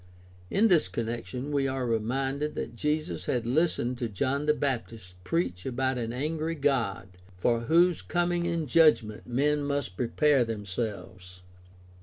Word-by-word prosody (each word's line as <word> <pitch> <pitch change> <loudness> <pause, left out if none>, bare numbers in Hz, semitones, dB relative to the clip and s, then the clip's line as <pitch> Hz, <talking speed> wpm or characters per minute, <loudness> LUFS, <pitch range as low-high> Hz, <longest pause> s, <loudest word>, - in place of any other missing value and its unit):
In 220 +3 +4
this 175 -7 +4
connection 120 +3 -4
we 140 -2 +1
are 130 -1 -2
reminded 135 +6 -1
that - - -5
Jesus 150 +6 -2
had 120 -2 -1
listened 125 -2 +1
to 120 - -2
John 135 +8 -1
the 150 - +5
Baptist 115 -9 -3
preach 90 0 -1
about 130 0 -1
an 115 -1 -3
angry 155 +5 -2
God 120 - 0 0.3
for 115 +5 +2
whose 170 +4 +4
coming 175 0 0
in 170 -2 -1
judgment 140 -8 +3
men 145 +4 +1
must 140 -9 -2
prepare 135 +2 +3
themselves. 100 -4 -5
130 Hz, 140 wpm, -28 LUFS, 115-150 Hz, 0.3 s, the